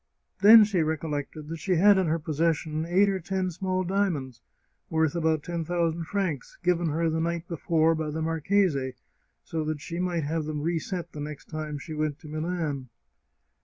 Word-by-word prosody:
Then 220 +2 +10
she 205 -4 +1
recollected 155 -1 -3
that 165 0 -5
she 180 +3 0
had 200 +3 +6
in 185 - +1
her 160 +1 +1
possession 155 0 -1
eight 190 +4 +4
or 195 -1 0
ten 185 +1 -2
small 185 +2 -1
diamonds, 170 - -1 0.5
worth 160 -1 +1
about 160 -3 +1
ten 170 -2 -3
thousand 170 0 -1
francs, 180 -8 -3
given 175 -1 +2
her 165 +2 0
the 160 0 0
night 170 +1 -2
be 170 - -4
fore 165 +1 +3
by 160 -1 -2
the 155 +2 -3
marchese, 160 -4 +1 0.5
so 160 -1 -3
that 155 -1 -2
she 170 +4 -6
might 175 -3 0
have 155 +2 -1
them 150 -1 -3
reset 170 +1 -2
the 150 - -8
next 150 0 -7
time 155 -1 -4
she 155 +3 -8
went 150 -1 -1
to 155 - -13
Milan. 155 -4 -3
165 Hz, 185 wpm, -27 LUFS, 155-175 Hz, 0.5 s, Then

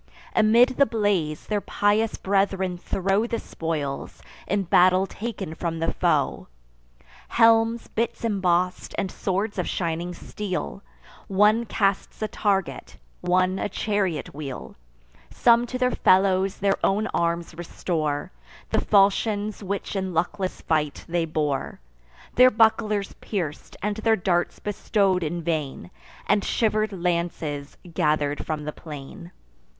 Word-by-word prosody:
Amid 230 +4 +6
the 280 - +5
blaze, 205 -9 0
their 210 -1 -1
pious 210 +3 +1
brethren 195 -2 0
throw 195 +4 0
The 235 - -2
spoils, 150 -8 -4 0.2
in 200 +1 +1
battle 185 +1 +4
taken 200 -5 -5
from 165 0 -3
the 165 - -1
foe: - - 0 0.8
Helms, 225 0 +4
bits 230 +1 -2
emboss'd, 185 -4 0
and 190 - -1
swords 200 +2 -2
of - - -1
shining 170 0 -2
steel; 185 - -5 0.5
One 210 +4 +3
casts 200 -2 0
a - - 0
target, 195 -3 -1 0.2
one 185 +1 +2
a - - -1
chariot 200 -5 -1
wheel; 135 - -7 0.5
Some 235 0 +4
to 255 - -4
their 250 0 +2
fellows 190 -1 +3
their 195 0 0
own 205 +3 +2
arms 170 0 -1
restore: 160 -3 -3 0.4
The - - +2
falchions 205 +1 +2
which 200 +1 -4
in 190 -2 -2
luckless 185 +3 -1
fight 150 -3 -1
they 170 0 0
bore, 150 -3 -2 0.5
Their 255 +1 +7
bucklers 215 -3 +2
pierc'd, 170 -8 -4 0.3
their 225 -1 +4
darts 175 -3 0
bestow'd 200 -2 0
in 170 +1 -3
vain, 150 - -3 0.3
And 205 - +2
shiver'd 215 -1 +1
lances 170 -5 -2 0.2
gather'd 150 -2 +1
from 155 -1 -3
the 150 0 -4
plain. 160 +4 -10
190 Hz, 125 wpm, -25 LUFS, 165-210 Hz, 0.8 s, Their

